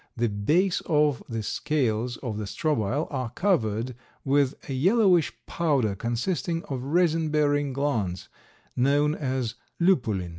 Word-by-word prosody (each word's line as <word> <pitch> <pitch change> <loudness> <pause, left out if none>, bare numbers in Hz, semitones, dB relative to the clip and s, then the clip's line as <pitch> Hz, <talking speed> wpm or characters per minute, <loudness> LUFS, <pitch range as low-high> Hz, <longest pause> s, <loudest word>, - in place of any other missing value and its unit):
The 120 0 +1
base 155 - +1
of 150 -3 +2
the 115 -2 -3
scales 120 -2 -1
of 110 -4 -3
the 105 - -3
strobile 140 +2 0
are 130 -4 -2
covered 120 - 0 0.3
with 140 0 +2
a 135 - -3
yellowish 180 - +3
powder, 140 -11 +1
consisting 160 - -2
of 130 -3 -4
resin 160 +2 +1
bearing 145 -2 +1
glands, 115 -10 -2 0.5
known 145 +4 +3
as 130 -6 -2 0.3
lupulin. 115 - +2
140 Hz, 125 wpm, -26 LUFS, 115-155 Hz, 0.5 s, yellowish